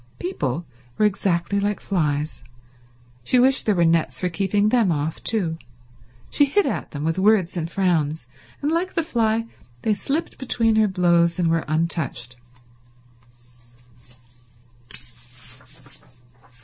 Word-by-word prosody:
People 165 -2 -3 0.3
were 215 - +3
exactly 195 -1 0
like 205 0 -1
flies. 150 -5 -2 0.8
She 250 - +2
wished 260 +1 +3
there 210 - +3
were 170 -1 +3
nets 165 -1 +1
for 180 - -1
keeping 200 +4 +1
them 225 -6 +3
off 155 0 -3
too. 170 -8 0 0.7
She 290 - +4
hit 390 +9 +2
at - - -3
them 145 0 -6
with 165 +3 -1
words 195 -3 +3
and 165 -2 -3
frowns, 160 -6 0 0.4
and 295 - +1
like 350 +3 -1
the 330 - +1
fly 230 -6 0 0.4
they 220 - +2
slipped 280 +10 -3
between 230 -4 +2
her 215 -1 +4
blows 170 -3 +2
and 170 -2 +1
were 165 -1 0
untouched. 155 -6 -2
185 Hz, 125 wpm, -22 LUFS, 165-220 Hz, 0.8 s, She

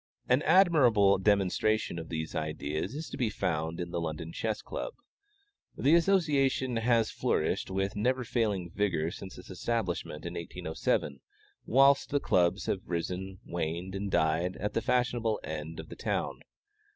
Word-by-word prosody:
An 125 +3 +4
admirable 135 - +5
demonstration 100 -1 +1
of 80 - -8
these 80 -1 -4
ideas 75 - -3
is 155 +2 -5
to - - -5
be 125 -5 +1
found 80 -4 -2
in 85 -1 -4
the 85 - -2
London 80 0 -4
Chess 110 -1 -2
Club. - - -5 0.8
This 155 +5 +5
association 135 -9 +2
has 115 -1 +2
flourished - - 0
with 95 +1 -1
never 125 +5 +1
failing 105 -7 -1
vigor 85 -5 0
since 95 +1 -9
its - - -11
establishment 95 -7 -2
in 85 - -4
1807, 75 -4 -2 0.5
whilst 140 +2 +4
Clubs 90 +2 +2
have 95 - -1
risen, 90 +3 -3
waned, 85 +2 -3
and 100 +1 -3
died 85 +1 +1
at 105 - -3
the 115 - 0
fashionable 120 -3 +1
end 80 +1 -5
of - - -8
the - - -8
town. - - -2
95 Hz, 150 wpm, -30 LUFS, 85-120 Hz, 0.8 s, admirable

